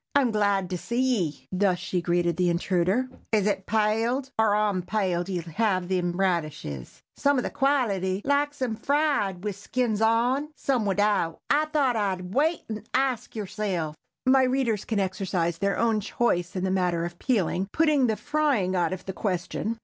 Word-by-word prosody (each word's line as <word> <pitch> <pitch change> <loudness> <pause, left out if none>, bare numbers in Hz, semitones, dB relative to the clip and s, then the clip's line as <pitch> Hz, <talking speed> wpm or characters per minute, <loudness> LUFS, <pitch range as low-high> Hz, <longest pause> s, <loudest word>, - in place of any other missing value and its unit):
"I'm 270 -4 +4
glad 200 -3 +1
to 180 - -2
see 235 +6 -3
ye," 180 - 0
thus 185 -1 +2
she 180 0 -2
greeted 175 -1 +1
the 180 0 +2
intruder. 185 +7 +1 0.2
"Is 210 -3 +2
it 200 -2 -1
paled 225 +5 +1
or 220 -1 +4
_on_paled 195 -3 0
ye'll 180 -3 -2
have 185 +1 0
them 180 -2 0
radishes? 155 - -2
Some 285 0 +2
of 250 - 0
the - - -3
quality 205 -9 +1
likes 285 0 +1
'em 230 -3 -1
fried 275 - 0
wid 210 -1 -2
the 195 - -16
skins 225 -1 -1
on—some 250 +2 +1
widout. 200 -4 +1
I 300 +2 +4
thought 290 -5 +1
I'd 190 -3 -2
wait 310 +6 +2
and 220 0 -7
ask 260 -3 0
yerself." 190 -7 -3 0.3
My 265 +1 +5
readers 255 -5 +1
can 220 -3 -1
exercise 185 -3 -1
their 200 0 0
own 225 -2 +2
choice 195 -4 -1
in 185 - -2
the 190 - 0
matter 180 -3 +1
of 175 0 -7
peeling, 195 -6 0
putting 300 -5 +3
the 220 - +1
frying 285 -10 0
out 175 -1 +1
of 185 0 -7
the 190 - -4
question. 195 +4 -2
205 Hz, 170 wpm, -26 LUFS, 180-250 Hz, 0.3 s, My